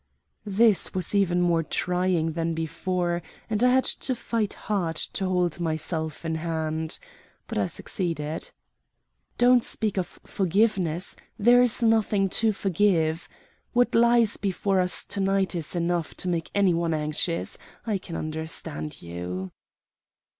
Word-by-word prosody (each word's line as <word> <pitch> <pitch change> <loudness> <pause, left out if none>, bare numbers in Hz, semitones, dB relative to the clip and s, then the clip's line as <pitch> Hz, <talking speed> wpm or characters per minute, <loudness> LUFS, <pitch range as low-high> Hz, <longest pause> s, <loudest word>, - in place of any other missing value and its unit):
This 210 0 +3
was 185 0 0
even 180 -3 +2
more 170 -2 +3
trying 180 0 0
than 165 0 -2
before, 175 +2 -1 0.3
and 215 +2 +1
I 250 - +6
had 260 +1 +4
to 260 - -1
fight 225 -3 -2
hard 180 -6 -2
to 190 +4 -2
hold 180 -3 0
myself 160 -1 -2
in 160 - -1
hand. 160 -1 -2 0.5
But - - -2
I - - +1
succeeded. 165 -5 -3 0.9
"Don't 245 0 +5
speak 215 -3 -2
of 175 - -5
forgiveness; 190 -3 0 0.2
there 240 +4 +6
is 245 -1 +3
nothing 215 -3 +3
to 225 -1 +4
forgive. 175 -5 +1 0.4
What 245 0 +3
lies 235 -1 +4
before 195 0 0
us 180 0 +1
to - - -3
night 195 0 +1
is 170 -1 -2
enough 170 -1 -1
to - - -3
make 170 -2 -1
any 200 -3 +4
one 165 -1 0
anxious. 155 +2 -1 0.3
I 210 -4 0
can 170 -2 -8
understand 155 - -4
you." 90 +2 -5
180 Hz, 140 wpm, -26 LUFS, 160-205 Hz, 0.9 s, I